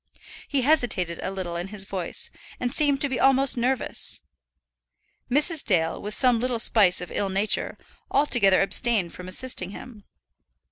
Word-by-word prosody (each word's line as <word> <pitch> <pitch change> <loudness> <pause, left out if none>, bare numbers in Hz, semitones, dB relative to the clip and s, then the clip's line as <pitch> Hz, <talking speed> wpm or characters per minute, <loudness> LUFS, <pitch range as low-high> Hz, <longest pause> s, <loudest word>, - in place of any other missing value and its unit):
He 275 -3 0
hesitated 235 - 0
a - - -3
little 185 -3 -5
in 175 +2 -4
his 200 -1 -6
voice, 185 -4 -3 0.3
and 245 -1 -2
seemed 285 -3 +1
to 285 - +3
be 265 -2 -3
almost 270 0 +3
nervous. 250 +1 -2 1.1
Mrs. 300 +4 +2
Dale, 165 -5 +1
with 210 +1 -1
some 250 -3 +3
little 250 0 -1
spice 205 -6 +3
of 180 - -8
ill 200 - -2
nature, 200 +3 0 0.3
altogether 235 -10 +3
abstained 205 -4 +2
from 180 - -10
assisting 185 -1 0
him. 215 0 -11
220 Hz, 150 wpm, -24 LUFS, 190-260 Hz, 1.1 s, to